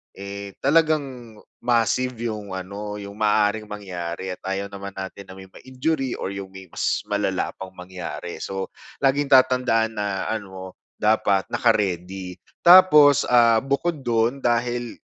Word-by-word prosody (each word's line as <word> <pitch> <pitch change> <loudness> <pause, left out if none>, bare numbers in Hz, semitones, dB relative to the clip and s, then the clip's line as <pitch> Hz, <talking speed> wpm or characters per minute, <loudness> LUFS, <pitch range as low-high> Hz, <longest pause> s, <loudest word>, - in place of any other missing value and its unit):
eh, 100 0 -8
talagang 140 -6 +1 0.3
massive 125 +2 +1
'yong 105 -4 -4
ano 100 +3 -6
'yong 100 0 -8
maaaring 105 0 +1
mangyari 95 -3 -5
at - - -38
ayaw 95 +1 -2
naman 100 0 -8
natin 95 0 -7
na 95 - -10
may 95 0 -12
ma-injury 130 +2 -3
or - - -4
'yong 100 -1 -6
may 95 0 -11
mas - - -1
malala - - -1
pang 95 -1 -8
mangyari. 90 -3 -7
So, 95 0 -4 0.3
laging 140 +1 +2
tatandaan 125 -4 +4
na, 100 -2 -2
ano, 95 -4 -6 0.3
dapat 105 -2 +2
naka-ready. 95 -4 0 0.3
Tapos, 150 -6 +8
ah, 115 -2 +5
bukod 140 +3 -1
do'n 120 +3 +1
dahil 120 0 -1
105 Hz, 135 wpm, -23 LUFS, 95-125 Hz, 0.3 s, Tapos